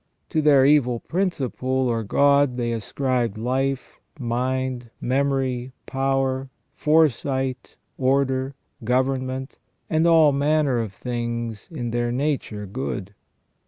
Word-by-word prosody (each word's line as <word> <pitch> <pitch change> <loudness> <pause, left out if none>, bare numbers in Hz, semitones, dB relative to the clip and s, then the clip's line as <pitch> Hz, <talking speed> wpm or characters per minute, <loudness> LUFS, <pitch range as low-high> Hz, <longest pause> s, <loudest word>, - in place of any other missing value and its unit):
To 155 - +1
their 140 -3 +5
evil 130 -5 +4
principle, 165 -8 -2
or 130 -3 +1
god, 140 +3 +3
they 120 -1 -1
ascribed 120 0 -1
life, 130 +3 -2 0.2
mind, 125 0 -2
memory, 130 -1 0
power, 135 0 0 0.2
foresight, 135 -4 +1 0.2
order, 135 0 +1 0.3
government, 130 +2 -1 0.3
and 160 +1 +3
all 160 -3 +6
manner 140 -2 +2
of 110 -4 -3
things 120 -1 -4
in 120 -7 -4
their 120 0 0
nature 130 -6 -2
good. 90 +1 -5
130 Hz, 105 wpm, -23 LUFS, 120-140 Hz, 0.3 s, all